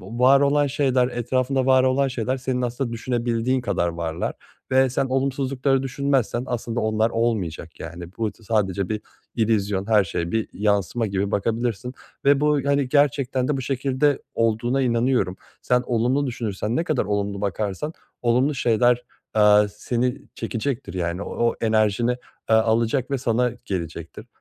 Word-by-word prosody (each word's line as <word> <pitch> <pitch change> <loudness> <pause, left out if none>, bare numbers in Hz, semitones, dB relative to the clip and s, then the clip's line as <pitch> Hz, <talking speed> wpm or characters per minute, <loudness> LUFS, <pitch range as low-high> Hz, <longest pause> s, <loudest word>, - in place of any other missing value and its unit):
var 125 +7 +4
olan 145 +1 +3
şeyler 130 -3 +2
etrafında 130 +2 0
var 130 -1 +5
olan 135 +1 +2
şeyler 130 0 -2
senin 125 -1 -2
aslında 120 0 -2
düşünebildiğin 120 +1 0
kadar 100 -7 0
varlar. 85 0 -3 0.4
Ve 130 0 +4
sen 135 +1 0
olumsuzlukları 135 0 0
düşünmezsen 135 -3 0
aslında 120 -1 -2
onlar 110 +1 +1
olmayacak, 100 -9 -2
yani, 85 +2 -7
bu 110 -2 -1
tı 115 - -21
sadece 100 -3 0
bir 110 -1 -2 0.3
illüzyon, 105 -3 0
her 105 -3 +4
şey 85 0 -3
bir 110 -1 0
yansıma 105 +2 0
gibi 100 0 -1
bakabilirsin 115 +3 -1 0.3
ve 140 0 +5
bu, 150 -1 +3
hani, 140 -2 +1
gerçekten 140 -2 +2
de 145 - +1
bu - - -3
şekilde 135 +2 0
olduğuna 115 +4 +1
inanıyorum. 115 -6 +1 0.3
Sen 125 0 +2
olumlu 125 +4 +1
düşünürsen, 115 -2 -3
ne 165 - 0
kadar 150 -10 0
olumlu 100 0 -2
bakarsan 105 - -2 0.3
olumlu 125 +5 +2
şeyler, 120 0 +2 0.3
aaa, 105 -1 +5
seni 120 +5 -2
çekecektir, 130 0 -3
yani, 85 +1 -2
o 120 0 0
enerjini, 110 +2 +2 0.3
aaa, 110 - +4
alacak 115 +4 +1
ve 135 - 0
sana 120 0 +1
gelecektir. 85 +2 -5
120 Hz, 145 wpm, -23 LUFS, 105-130 Hz, 0.4 s, var